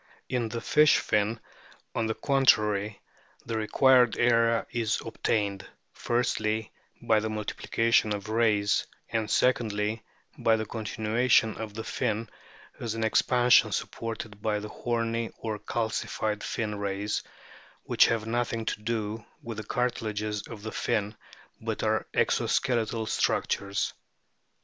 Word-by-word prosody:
In 120 -3 -1
the 115 +1 -4
fish 150 +6 +5
fin, 105 +2 0 0.5
on 115 - 0
the 110 - -1
contrary, 105 -7 +2 0.5
the 115 - -3
required 125 +2 +4
area 115 -1 +3
is 115 -3 0
obtained: 100 -3 -1 0.3
firstly, 110 -2 -1 0.3
by 110 -1 +4
the 110 +1 -2
multiplication 110 +1 +1
of 100 -1 -3
rays, 110 -2 +2 0.2
and, 110 -1 -1
secondly, 110 -3 +1 0.4
by 115 - +4
the 110 0 -2
continuation 110 +2 +1
of 110 -2 -6
the 110 - -4
fin 115 -2 -2 0.5
as 115 -2 -3
an 115 - -2
expansion 125 +2 +4
supported 110 -2 -4
by 105 -1 0
the 105 +1 -6
horny 115 0 -2
or 110 -2 -4
calcified 110 -2 -2
fin 105 -3 -3
rays, 100 +1 -2 0.6
which - - +4
have 115 -1 0
nothing 115 0 -1
to 105 - -3
do 110 -1 -3 0.2
with 115 -2 -6
the 110 - -4
cartilages 110 -3 -2
of 110 -3 -9
the 110 - -4
fin, 110 -2 -1 0.5
but - - -3
are - - +1
exoskeletal 115 -2 +1
structures. 100 -2 0
110 Hz, 125 wpm, -28 LUFS, 105-115 Hz, 0.6 s, fish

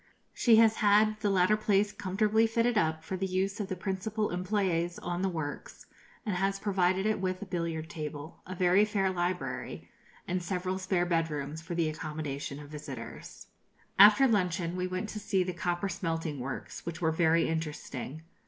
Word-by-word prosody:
She 235 -3 +5
has 220 0 +5
had 215 +1 +4
the 210 - 0
latter 190 +1 +4
place 210 -1 +2
comfortably 215 +4 +1
fitted 230 +1 +1
up 160 -6 +1
for 190 - -4
the 190 +1 -2
use 190 +2 -1
of 205 - -2
the 190 - -3
principal 200 +3 -2
employés 180 -2 0
on 175 0 -2
the 195 - +1
works, 160 -5 -6 0.4
and 210 -4 -1
has 195 +1 0
provided 190 -1 +1
it 215 -2 +1
with 185 -1 -1
a - - -6
billiard 165 -4 -3
table, 150 -1 -7
a 185 - -5
very 185 +2 +4
fair 200 -3 +1
library, 180 0 -3 0.4
and 185 0 -1
several 185 +1 -2
spare 185 -2 +1
bed 165 -2 +1
rooms 150 +1 -4
for 165 +1 -5
the 165 -2 +1
accommodation 150 -2 -4
of 145 -1 -10
visitors. 135 -6 -8 0.5
After 215 +7 +9
luncheon 180 -5 0
we 180 0 -1
went 185 +3 -3
to 215 - -5
see 190 -2 +1
the 180 0 -3
copper 175 +2 -1
smelting 165 -5 -3
works, 130 +2 -6
which 170 -1 -5
were 160 -2 +2
very 165 0 +3
interesting. 155 -2 -4
180 Hz, 180 wpm, -30 LUFS, 160-200 Hz, 0.5 s, After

